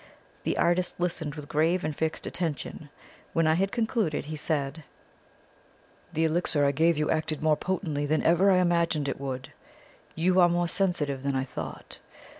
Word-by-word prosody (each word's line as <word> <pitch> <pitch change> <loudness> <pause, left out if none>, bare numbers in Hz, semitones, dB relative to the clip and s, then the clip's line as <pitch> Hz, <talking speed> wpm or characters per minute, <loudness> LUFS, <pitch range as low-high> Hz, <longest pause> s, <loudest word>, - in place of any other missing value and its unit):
The - - -1
artist 175 +1 +1
listened 165 -4 -2
with 150 -2 -8
grave 165 +5 +1
and 155 -1 -2
fixed 160 +1 -2
attention. 155 -3 -4 0.4
When 165 - +2
I 155 - +4
had 195 +4 +1
concluded 220 - 0
he 155 +1 -5
said: 150 0 -2 1.3
"The 160 - 0
elixir 160 -2 +2
I 140 - +4
gave 160 +3 +2
you 150 0 +1
acted 155 -1 -1
more 155 -1 +4
potently 155 -5 -2
than 155 +2 +1
even 175 +4 +5
I 190 - +5
imagined 170 -4 +2
it 135 - -3
would. 130 -2 -5 0.6
You 180 +3 +3
are 175 -1 +6
more 175 0 +1
sensitive 160 -8 0
than 140 0 -1
I 130 - +1
thought. 130 - -8
160 Hz, 170 wpm, -27 LUFS, 145-175 Hz, 1.3 s, are